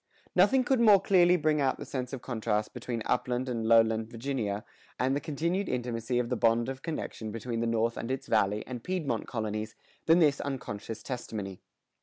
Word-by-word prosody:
Nothing 210 +9 +5
could 260 0 +2
more 215 -4 +7
clearly 180 -2 +4
bring 155 -2 +1
out 135 -1 +1
the - - -7
sense 125 -2 -4
of 135 -3 -6
contrast 110 -3 -1
between 115 -3 -4
upland 125 +1 0
and 115 -3 -2
lowland 115 -1 +4
Virginia, 115 -4 -3 0.3
and 130 +2 +1
the 145 - -1
continued 170 +6 -1
intimacy 120 -1 -2
of 120 -1 0
the 125 - 0
bond 115 +1 +2
of 135 0 -6
connection 150 -8 -4
between 115 +1 -4
the 115 - 0
North 115 0 +1
and 115 - -4
its 130 +1 -2
Valley 105 -3 +1
and 125 -2 -7
Piedmont 160 -11 -2
colonies, 110 -1 -3 0.3
than 165 +1 +7
this 150 -5 +3
unconscious 115 -5 -5
testimony. 105 -7 -5
125 Hz, 185 wpm, -29 LUFS, 115-145 Hz, 0.3 s, more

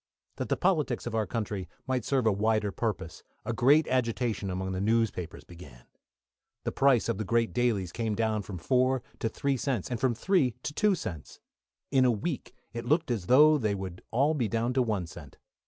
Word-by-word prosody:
That - - -4
the - - +1
politics 155 -10 +1
of 120 - -4
our 110 -2 0
country 105 -6 -3 0.2
might 130 -3 -1
serve 130 0 +1
a 110 - +5
wider 105 0 +1
purpose, 95 -7 -3 0.2
a 115 - -1
great 140 +6 +4
agitation 115 -4 -1
among 95 +1 -3
the 95 0 -2
newspapers 110 -6 0
began. 75 -9 -13 0.8
The - - -2
price 135 -6 +3
of - - -1
the - - -1
great 115 +2 +1
dailies 110 -8 0
came 110 0 -2
down 110 -1 0
from 100 -2 -7
four 130 +6 +1 0.2
to 115 - 0
three 140 +4 -1
cents, 125 -4 -2
and 120 - -2
from 125 -1 +1
three 145 - +2
to 145 - -4
two 210 +4 +3
cents. 85 - -7 0.5
In 135 -2 +4
a 125 - +5
week 125 +6 -4 0.2
it 115 0 -5
looked 155 +2 +1
as 105 -7 -2
though 150 +4 +6
they 105 -4 0
would 95 -2 -6
all 140 +6 +2
be 125 -7 0
down 115 +4 -1
to 130 - +2
one 105 -7 -1
cent. 80 -4 -12
115 Hz, 200 wpm, -29 LUFS, 100-130 Hz, 0.8 s, though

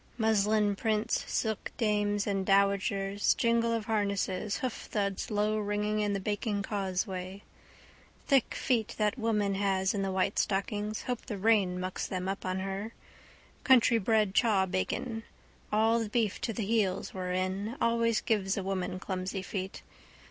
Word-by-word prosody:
Muslin 215 -2 +2
prints, 215 -1 0
silkdames 210 -2 0
and 195 -2 0
dowagers, 200 0 +2
jingle 235 -1 +2
of 225 -2 -1
harnesses, 200 -2 -1
hoofthuds 205 -5 -2
lowringing 210 0 0
in 205 -1 0
the 200 - -1
baking 205 +1 -2
causeway. 190 -1 -3 0.8
Thick 270 -4 +2
feet 230 -5 0
that 210 +3 0
woman 210 -3 +1
has 195 -1 +1
in 200 - -1
the 195 -1 -1
white 190 +2 +1
stockings. 210 +2 -1
Hope 250 -2 -4
the 210 - -4
rain 195 -3 +2
mucks 185 0 -3
them 185 -1 -3
up 195 -1 -3
on 185 0 -1
her. 195 +4 -4 0.7
Countrybred 225 -5 +4
chawbacon. 205 +2 +1 0.5
All 225 +2 +3
the 225 -2 -3
beef 220 -2 0
to 230 - -1
the 220 -1 -3
heels 205 -4 0
were 185 -1 -3
in. 190 +6 -2
Always 230 -1 +2
gives 200 -3 0
a 195 - -1
woman 185 -1 -2
clumsy 185 +1 -4
feet. 190 -1 -5
205 Hz, 140 wpm, -30 LUFS, 195-220 Hz, 0.8 s, Countrybred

